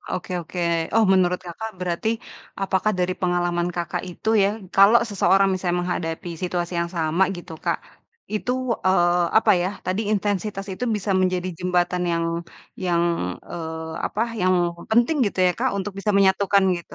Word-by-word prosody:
oke 185 - -4
oke. 175 +2 -9 0.4
Oh, 225 0 +5
menurut 180 -1 +3
Kakak 220 +6 -6
berarti 180 +4 -1 0.5
apakah 195 +2 +1
dari 180 0 0
pengalaman 175 -1 0
Kakak 175 -1 -3
itu 180 - -6
ya, 195 - +4 0.3
kalau 200 +4 +7
seseorang, 195 -1 +3
misalnya 180 -1 -1
menghadapi 175 0 -3
situasi 175 -1 -2
yang 170 0 -2
sama, 160 +3 +1
gitu, 175 -1 -10
Kak. - - +1 0.6
Itu, 230 +4 -1 0.3
eee, 175 -1 +3
apa 220 - +2
ya, 180 - 0 0.2
tadi 185 +3 0
intensitas 200 -1 -1
itu 185 - -8
bisa 205 0 -3
menjadi 185 -1 0
jembatan 180 0 0
yang 170 0 0 0.6
yang, 170 -1 +2 0.5
eee, 160 -1 -5
apa, 210 - -4 0.2
yang 185 0 +4 0.4
penting 240 +8 +3
gitu 200 - -4
ya, 180 - +3
Kak? - - +1
Untuk 200 +1 -4
bisa 210 +2 0
menyatukan 195 0 +4
gitu. 170 -3 -10
180 Hz, 155 wpm, -23 LUFS, 175-195 Hz, 0.6 s, kalau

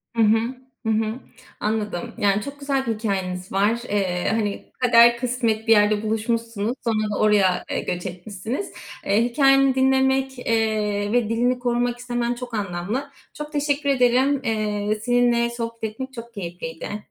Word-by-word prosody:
Hı 230 - +2
hı. 215 +1 +5 0.5
Hı - - 0
hı. 220 +2 0 0.4
Anladım. 210 -4 -2
Yani, 200 0 +2
çok 280 +5 -8
güzel 275 -1 -1
bir 225 - +1
hikâyeniz 190 -4 -3
var. 205 +4 +2
Eee, 185 -3 0
hani, 210 -2 -1
kader 235 -1 +6
kısmet 235 -3 -1
bir - - +4
yerde 210 0 +4
buluşmuşsunuz, 225 0 -1
sonra 215 -2 0
da - - -3
oraya, 200 -4 +3
eee, - - 0
göç 180 +1 -4
etmişsiniz. 195 - -5 0.3
Eee, 205 +4 +3
hikâyeni 270 +1 +4
dinlemek, 265 0 +2
eee, 215 -3 0
ve 240 -3 +2
dilini 245 +2 +1
korumak 245 0 0
istemen 240 -1 -1
çok 245 -1 -8
anlamlı. 210 +7 -3 0.2
Çok 300 0 -7
teşekkür 285 -1 0
ederim. 260 +2 +3
Eee, 215 -2 -1
seninle 240 -1 +3
sohbetim 230 +2 -5
çok 235 -1 -10
keyifliydi. 175 +1 -6
230 Hz, 145 wpm, -23 LUFS, 210-245 Hz, 0.5 s, kader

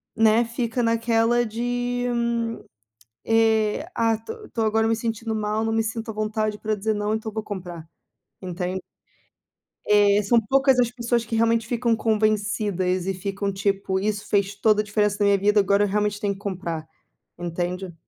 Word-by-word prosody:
né, 225 +1 +4
fica 235 +1 -2
naquela 230 +1 +2
de 245 +2 -2 1.2
eh: 225 +4 +2
"Ah, 230 -1 +2
estou 420 - -8
estou 225 - -2
agora 220 +1 +2
me 225 - +2
sentindo 225 0 -3
mal, 215 0 -1
não 225 - -1
me 225 - +2
sinto 225 +1 -4
à - - -7
vontade 215 0 -1
para 215 0 -1
dizer 215 +2 -1
não, 210 +1 -1
então 220 0 -3
eu - - -20
vou 220 - -2
comprar", 175 -6 -7 0.5
entende. 180 +1 -3 1.1
É, 205 0 +5
são 235 +4 +4
poucas 270 +3 +3
as 240 - +3
pessoas 235 -1 -1
que 225 0 -3
realmente 230 0 +2
ficam 235 -1 +1
convencidas, 210 -4 0
e 195 - 0
ficam 200 +1 -3
tipo: 195 -1 -1
"Isso 205 0 -2
fez 200 0 +1
toda 210 0 +3
a - - -8
diferença 210 -1 +1
na 205 - +3
minha 200 0 +4
vida, 205 +2 +3
agora 200 +1 +3
eu - - -1
realmente 210 0 0
tenho 205 -1 0
que 195 - -13
comprar", 175 -5 -4 0.5
entende. 175 +1 -3
215 Hz, 175 wpm, -24 LUFS, 200-225 Hz, 1.2 s, É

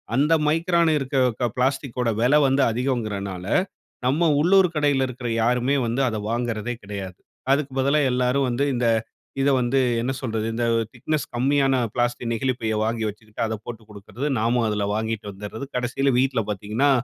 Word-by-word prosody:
அந்த 150 +4 +3
மைக்ரான் 170 +1 +2
இருக்க 130 -3 0
பிளாஸ்டிக் 135 -1 -1
ஓட 120 - +1
விலை 140 +5 +5
வந்து 135 +1 +2
அதிகோங்கறதுனால, 105 -7 -2 0.6
நம்ம 160 +6 +3
உள்ளூர் 185 +2 +5
கடையில 140 -3 +2
இருக்கிற 125 -1 -5
யாருமே 125 +3 +2
வந்து 120 +4 -1
அத 110 - -3
வாங்கறதே 120 0 -2
கெடையாது. 100 -2 -7 0.3
அதுக்கு 140 -1 0
பதிலா 140 +3 +3
எல்லாரும் 125 +2 +1
வந்து 125 +4 0
இந்த 120 -1 0 0.5
இதை 140 +1 +3
வந்து 130 +2 +1 0.2
என்ன 125 +3 -1
சொல்றது 110 -3 -2
இந்த 120 +1 -1 0.3
திக்னஸ் 145 +4 -2
கம்மியான 135 +2 +2 0.2
பிளாஸ்டிக் 120 -1 -1
நெகிழிப் 130 +2 -1
பையை 110 -1 -1
வாங்கி 115 0 -1
வச்சுக்கிட்டு 105 +1 -7
அதை 110 0 -2
போட்டு 115 -2 -8
கொடுக்குறது. 105 +6 -6
நாம 120 +1 +2
அதுல 105 -1 -1
வாங்கிட்டு 110 -1 -3
வந்துடுறது 105 +6 -7
கடைசியில 125 +2 0
வீட்ல 130 -3 +2
பார்த்தீங்கன்னா, 105 +8 0
125 Hz, 155 wpm, -23 LUFS, 110-135 Hz, 0.6 s, விலை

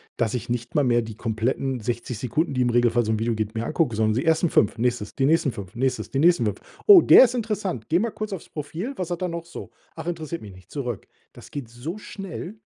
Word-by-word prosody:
dass 115 -2 0
ich 120 -1 -3
nicht 120 +3 -4
mal 145 -2 +3
mehr 120 -1 +3
die 110 -2 -7
kompletten 120 +3 -2
60 120 +1 -3
Sekunden, 140 +6 -1
die 130 - 0
im 125 - +2
Regelfall 120 0 +3
so 110 - -1
'n 110 - 0
Video 115 +1 0
geht, 110 0 -3
mir 115 +1 -3
angucke, 155 -9 0
sondern 110 0 +2
die 125 - 0
ersten 160 +1 +3
5, 105 - +2
nächstes, 120 -3 -1
die 135 - +1
nächsten 155 -1 +3
5, 100 -4 -9
nächstes, 130 +1 -1
die 135 - -1
nächsten 165 -6 +4
5. 105 -1 -2 0.3
Oh, 395 -4 +10
der 265 - +9
ist 245 0 -3
interessant. 205 - -3
Gehe 170 +3 +3
mal 230 0 -1
kurz 215 -1 -5
aufs 190 - -6
Profil, 165 - -5
was 180 -2 -4
hat 175 - -2
der 185 - -1
noch 170 -1 -5
so? 170 - -9 0.3
Ach, 160 - -7
interessiert 165 -1 -4
mich 100 -3 -10
nicht, 90 0 -17
zurück. 125 -7 -4 0.3
Das - - -14
geht 140 -5 -6
so 125 - -7
schnell. 195 -1 -7
130 Hz, 250 wpm, -24 LUFS, 115-170 Hz, 0.3 s, Oh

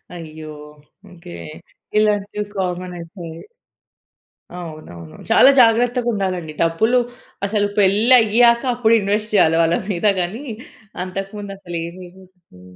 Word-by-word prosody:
అయ్యో! 155 -2 -9 0.6
ఓకే. 175 0 -13 0.7
ఇలాంటివి 210 -1 0
కామన్ 180 -1 -3
అయిపోయాయి. 165 -1 -9 1.2
అవునవును. 155 - -10
చాలా 265 - +7
జాగ్రత్తగుండాలండి. 225 -8 +1
డబ్బులు 220 +10 +2 0.5
అసల 205 0 0
పెళ్లి 205 +5 +4
అయ్యాక 235 +2 +4
అప్పుడు 230 -2 +2
ఇన్వెస్ట్ 210 +2 -1
చేయాలి 165 -4 +4
వాళ్ళ 165 +1 +2 0.2
మీద 175 +3 -3
గాని. 200 +10 -3 0.6
అంతకు 195 +1 -5
ముందు 200 -1 -7
అసలు 175 -3 -6
ఏమి 175 +2 -9
ఇవ్వకూడదు. 180 - -20
190 Hz, 110 wpm, -19 LUFS, 170-215 Hz, 1.2 s, చాలా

